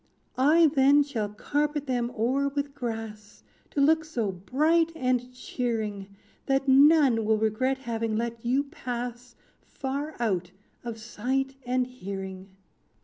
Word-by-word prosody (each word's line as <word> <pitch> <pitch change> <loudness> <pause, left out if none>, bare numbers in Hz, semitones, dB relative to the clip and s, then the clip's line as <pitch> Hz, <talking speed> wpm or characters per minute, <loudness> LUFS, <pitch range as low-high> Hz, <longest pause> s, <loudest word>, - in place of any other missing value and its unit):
"I 310 +5 +6
then 280 +1 +5
shall 230 -8 -3
carpet 290 +7 -1
them 245 -2 -1
o'er 260 +5 +1
with 280 0 -3
grass, 225 -5 -6 0.3
To - - -3
look 315 +3 +4
so 240 -10 -2
bright 310 - +1
and 255 -4 0
cheering, 225 -5 -3 0.4
That 270 0 +1
none 275 -3 +6
will 220 0 +2
regret 220 +5 0
having 230 -4 -3
let 230 0 -3
you 255 +4 +2
pass 245 -4 -6 0.3
Far 280 +3 -5
out 190 -7 0 0.3
of 235 -2 -5
sight 255 +4 -2
and 250 0 +1
hearing. 195 -5 -7
250 Hz, 130 wpm, -27 LUFS, 225-280 Hz, 0.4 s, I